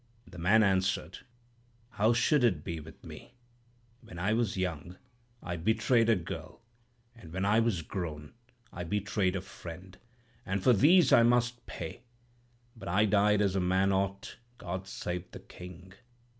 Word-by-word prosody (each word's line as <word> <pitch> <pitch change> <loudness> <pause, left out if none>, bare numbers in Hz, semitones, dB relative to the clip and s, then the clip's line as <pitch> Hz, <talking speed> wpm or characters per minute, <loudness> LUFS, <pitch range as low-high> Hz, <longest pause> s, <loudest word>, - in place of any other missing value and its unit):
"The 90 -1 -12
man 105 +6 +4
answered, 95 -1 0 0.7
'How 110 0 +2
should 120 +4 +3
it 115 -6 +2
be 85 -1 -4
with 80 +1 -13
me? 125 - -12 0.7
When 110 -8 -12
I 95 +5 0
was 110 -3 0
young, 90 -2 -3 0.5
I 85 -1 -4
betrayed 110 +5 +2
a 115 - +5
girl; 90 +5 -7 0.5
and 95 -9 -13
when 95 +3 -2
I 105 +3 +4
was 110 -8 0
grown, 75 -5 -6 0.4
I 85 - -5
betrayed 100 0 -1
a 95 - -2
friend, 90 -1 -11 0.4
and 95 0 -3
for 125 - +6
these 155 - +5
I - - +8
must 120 0 +1
pay. 85 +7 -7 0.7
But 105 -4 -10
I 100 +5 +3
died 105 0 +3
as 95 -1 0
a - - +2
man 95 +2 +2
ought. 100 0 -2 0.2
God 95 -1 -6
save 90 -2 -5
the - - -10
King!' 90 +1 -12
95 Hz, 155 wpm, -30 LUFS, 90-110 Hz, 0.7 s, I